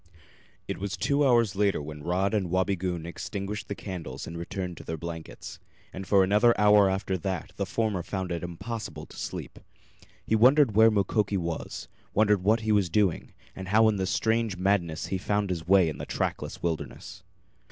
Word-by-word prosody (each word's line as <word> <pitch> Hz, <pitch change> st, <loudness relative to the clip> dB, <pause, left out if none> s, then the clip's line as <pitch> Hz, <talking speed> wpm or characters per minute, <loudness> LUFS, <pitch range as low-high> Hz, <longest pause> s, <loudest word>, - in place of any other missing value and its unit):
It -, -, -4 dB
was 100 Hz, 0 st, -3 dB
two 145 Hz, +1 st, +1 dB
hours 120 Hz, -6 st, +3 dB
later 100 Hz, 0 st, +2 dB
when 75 Hz, 0 st, -8 dB
Rod 95 Hz, +6 st, 0 dB
and 100 Hz, -5 st, 0 dB
Wabigoon 90 Hz, -2 st, -1 dB
extinguished 100 Hz, +3 st, -5 dB
the 100 Hz, -, -4 dB
candles 95 Hz, -6 st, -6 dB
and 85 Hz, -, -8 dB
returned 90 Hz, +1 st, -5 dB
to -, -, -9 dB
their 80 Hz, -, -4 dB
blankets. 80 Hz, 0 st, -8 dB, 0.3 s
And 95 Hz, 0 st, -7 dB
for 100 Hz, -2 st, +5 dB
another 105 Hz, +5 st, +4 dB
hour 105 Hz, -1 st, +6 dB
after 95 Hz, -1 st, -1 dB
that 95 Hz, -1 st, -4 dB
the -, -, -2 dB
former 110 Hz, -5 st, -1 dB
found 95 Hz, 0 st, -4 dB
it 85 Hz, -, -2 dB
impossible 95 Hz, +7 st, -6 dB
to -, -, -15 dB
sleep. -, -, -6 dB, 0.7 s
He 110 Hz, -, +2 dB
wondered 125 Hz, 0 st, +5 dB
where 110 Hz, +1 st, +7 dB
Mukoki 105 Hz, -1 st, +1 dB
was 85 Hz, -2 st, -4 dB, 0.3 s
wondered 105 Hz, -2 st, +3 dB
what 110 Hz, +3 st, +3 dB
he 110 Hz, -1 st, 0 dB
was 100 Hz, -4 st, +3 dB
doing, 95 Hz, -1 st, 0 dB, 0.2 s
and 95 Hz, 0 st, -7 dB
how 110 Hz, +3 st, +5 dB
in 105 Hz, -2 st, -1 dB
his 95 Hz, -1 st, -1 dB
strange 110 Hz, -2 st, 0 dB
madness 90 Hz, -4 st, 0 dB
he 95 Hz, -, 0 dB
found 100 Hz, 0 st, 0 dB
his 85 Hz, -2 st, -4 dB
way 95 Hz, -2 st, +5 dB
in 75 Hz, -4 st, -4 dB
the -, -, -6 dB
trackless -, -, -3 dB
wilderness. 85 Hz, +2 st, -4 dB
95 Hz, 185 wpm, -27 LUFS, 90-105 Hz, 0.7 s, where